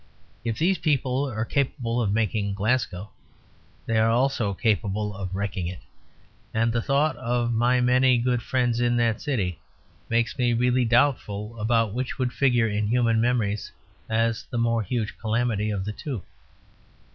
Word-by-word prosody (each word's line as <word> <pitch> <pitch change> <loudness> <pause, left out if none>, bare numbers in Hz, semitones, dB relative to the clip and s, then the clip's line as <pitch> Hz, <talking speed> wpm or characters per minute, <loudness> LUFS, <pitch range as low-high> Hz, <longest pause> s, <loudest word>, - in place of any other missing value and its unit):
If 115 -2 -2
these 180 +2 +2
people 140 -3 0
are 110 -2 -2
capable 120 -3 -1
of 105 -4 0
making 105 -2 0
Glasgow, 105 -3 -1 0.7
they 115 -1 +1
are 110 +1 +4
also 120 -3 +1
capable 105 -1 0
of 95 -1 -5
wrecking 95 -3 -2
it; 90 0 -5 0.8
and 115 +1 +2
the 120 - +1
thought 140 +3 +1
of 120 -1 -1
my 120 +2 +3
many 125 0 +4
good 120 0 0
friends 125 -2 0
in 120 0 +2
that 115 -2 +1
city 100 - -2 0.5
makes 115 +4 0
me 120 -1 +2
really 125 +1 +2
doubtful 115 -3 +1
about 115 -1 +1
which 130 +4 -3
would 125 -2 -1
figure 120 -4 +3
in 105 0 -1
human 115 -1 +2
memories 115 -4 0 0.4
as 115 +2 +1
the 120 - -4
more 115 -1 +1
huge 110 0 -3
calamity 110 -1 0
of 100 -2 -2
the 105 - -3
two. 125 - -5
115 Hz, 155 wpm, -25 LUFS, 105-125 Hz, 0.8 s, are